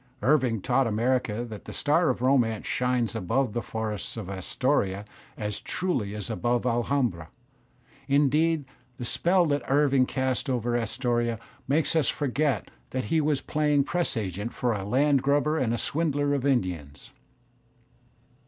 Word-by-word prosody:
Irving 125 -6 +2
taught 135 -2 +2
America 115 0 0
that 110 -3 -9
the - - -8
star 160 +3 +2
of 125 -1 -1
romance 120 -5 +2
shines 125 -3 0
above 115 +5 0
the 120 - -1
forests 110 -2 -4
of 100 -4 -5
Astoria 100 0 0 0.3
as 105 -1 -3
truly 125 - -2
as 105 -3 -5
above 120 +6 0
Alhambra; 120 - 0 0.8
indeed 150 +2 +2 0.3
the 120 - -5
spell 175 +8 +2
that 145 -2 +1
Irving 135 -2 +3
casts 130 +1 -1
over 120 -2 0
Astoria 120 0 0 0.3
makes 150 +4 +2
us 160 -4 +3
forget 140 - -1 0.2
that 130 0 -2
he 160 - +4
was 150 -2 +1
playing 150 -2 +2
press 170 -3 -1
agent 100 +2 -3
for 120 -2 0
a 100 -3 -3
land 135 +5 +3
grabber 145 +3 +2
and 120 -3 +1
a 120 - 0
swindler 145 0 0
of 140 -1 0
Indians. 90 - -2
125 Hz, 145 wpm, -27 LUFS, 110-145 Hz, 0.8 s, he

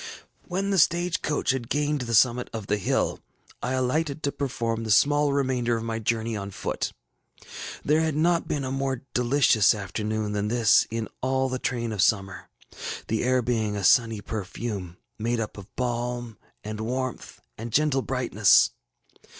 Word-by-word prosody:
When 195 +2 -1
the 195 - +3
stage 170 +2 +2
coach 150 -3 0
had 130 -3 -3
gained 145 -1 0
the 115 -1 -1
summit 125 +2 +3
of 110 -2 -5
the 105 +1 0
hill, - - 0 0.4
I 125 - -2
alighted 140 +4 -1
to 140 - +1
perform 115 -5 -2
the 110 - -5
small 145 +6 +4
remainder 130 -4 +1
of 115 - -5
my 115 0 -3
journey 115 0 -1
on 100 -1 -4
foot. 100 - -3 0.9
There 155 +2 +3
had 160 -2 0
not 170 +2 +2
been 145 -2 -1
a 130 - -3
more 135 -2 -2
delicious 125 -4 +4
afternoon 105 +2 -3
than 105 0 -1
this 115 -1 +4
in 115 0 -3
all 130 0 +1
the 130 0 -3
train 120 -3 -2
of 105 -3 -1
summer, 95 -3 0 0.6
the 110 - 0
air 130 0 +2
being 110 -3 0
a 100 - -3
sunny 115 0 +4
perfume, 100 -3 -5 0.2
made 120 +2 0
up 110 - -4
of 100 -2 -10
balm 120 -2 -3 0.2
and 110 +1 -5
warmth, 130 +2 -4 0.2
and 115 +1 -7
gentle 145 0 +2
brightness. 120 -7 +3
120 Hz, 165 wpm, -26 LUFS, 110-135 Hz, 0.9 s, small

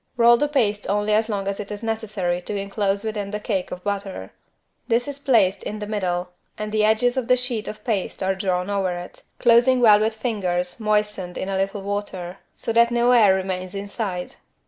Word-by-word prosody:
Roll 235 0 +7
the 295 +5 +1
paste 215 -8 0
only 205 +1 +1
as 220 +1 +2
long 200 -2 -2
as 200 0 -2
it 210 0 -6
is 210 +2 -6
necessary 210 -6 -2
to 205 +3 -4
enclose 200 0 -1
within 210 -2 -3
the 210 +1 -3
cake 200 -3 -2
of 180 0 -7
butter. 195 - -4 0.6
This 235 +3 +1
is 285 -1 -5
placed 220 -9 +3
in 210 - -5
the 210 - -5
middle 180 -4 -2 0.3
and 215 0 -4
the 215 0 +2
edges 220 +4 +3
of 255 -3 -1
the 250 - +4
sheet 245 -3 -2
of 215 - -7
paste 205 -5 -2
are 190 0 +2
drawn 185 -1 -1
over 190 -3 0
it, 175 0 -9 0.2
closing 240 +2 +5
well 215 -4 +7
with 220 +1 0
fingers 185 -5 -2
moistened 210 -4 -1
in 190 - -3
a 195 - -1
little 195 +1 -2
water 195 -3 -4 0.2
so 230 - -3
that 235 +1 +5
no 240 +1 +3
air 215 -6 +6
remains 185 0 -3
inside. 200 -2 -4
205 Hz, 205 wpm, -23 LUFS, 190-225 Hz, 0.6 s, Roll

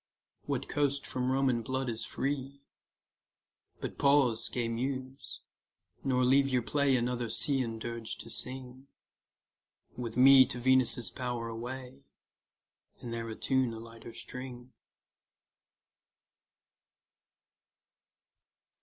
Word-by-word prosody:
What - - -1
coast 140 -1 +1
from 125 0 -1
Roman 130 -3 +2
blood 130 +3 -2
is 115 -1 -1
free? 140 0 -3 1.2
But - - -5
pause, 135 -5 +4
gay 120 -2 -1
Muse, 130 +3 -4 0.6
nor 125 -2 +2
leave 135 +2 +4
your 125 -2 +1
play 140 +1 +2
Another 120 -1 0
Cean 130 -5 0
dirge 115 0 -5
to - - -8
sing; 130 +1 -5 1.1
With 120 -2 -5
me 130 0 +9
to 125 - -4
Venus' 130 -1 +3
bower 120 -3 -3
away, 125 +3 -6 1.0
And 115 - -6
there 115 0 -4
attune 130 +2 0
a 110 - -7
lighter 115 0 -11
string. 125 -1 -8
125 Hz, 100 wpm, -31 LUFS, 120-135 Hz, 1.2 s, me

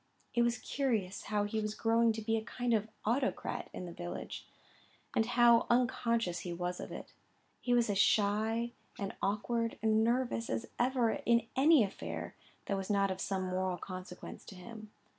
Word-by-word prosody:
It 240 - +3
was 235 0 +2
curious 220 -9 -1
how 210 0 +1
he 205 +2 -1
was 210 0 -2
growing 230 +1 +3
to 220 0 -5
be 225 +1 +1
a 220 - 0
kind 245 +1 -1
of 215 -1 +1 0.2
autocrat 250 +5 -1
in 180 - -6
the 175 - -7
village; 85 - -6 0.7
and 225 - +4
how 240 -1 +5
unconscious 235 -6 +2
he 175 - -5
was 175 +1 -3
of - - -6
it. - - -8 0.5
He 245 -1 +2
was 240 -1 +3
as 200 -2 0
shy 220 +3 +2 0.3
and 200 -2 -3
awkward 230 +3 0
and 220 0 +3
nervous 240 0 0
as - - -1
ever 245 -2 +3
in 235 -1 +2
any 290 -1 +6
affair 195 - -5 0.3
that 200 - -1
was 190 -1 -4
not 200 -1 +2
of 185 - -4
some 190 -1 -1
moral 185 0 -1
consequence 185 -1 -8
to 195 - -10
him. 215 +3 -10
220 Hz, 180 wpm, -33 LUFS, 195-235 Hz, 0.7 s, any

